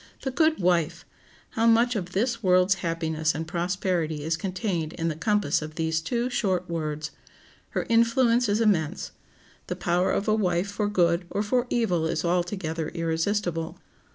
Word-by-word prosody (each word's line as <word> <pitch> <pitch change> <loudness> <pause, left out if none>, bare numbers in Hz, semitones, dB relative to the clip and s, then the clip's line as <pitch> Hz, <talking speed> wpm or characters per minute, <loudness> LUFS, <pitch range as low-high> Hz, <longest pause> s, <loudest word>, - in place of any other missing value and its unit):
The 265 - -1
good 315 +1 +2
wife! 175 -2 +1 0.5
How 225 +1 +1
much 235 +2 +4
of 180 -3 -4
this 230 +4 0
world's 185 -1 +4
happiness 160 -2 -1
and 160 +1 -4
prosperity 175 -3 -1
is 160 +1 0
contained 180 -2 -3
in 165 0 -2
the 155 - -3
compass 205 -2 +1
of 155 0 -7
these 160 -1 0
two 240 +8 -1
short 190 -8 0
words! 155 -2 -3 0.7
Her - - 0
influence 230 0 +3
is 205 +2 +2
immense. 185 -6 +1 0.6
The 180 - -3
power 175 0 +1
of 200 - -1
a 215 - +4
wife 190 -2 0
for 205 0 -1
good 175 -3 +2
or 205 - -1
for 245 +4 0
evil 180 -9 +1
is 160 - -1
altogether 175 -2 -1
irresistible. 165 0 -1
180 Hz, 160 wpm, -26 LUFS, 165-210 Hz, 0.7 s, much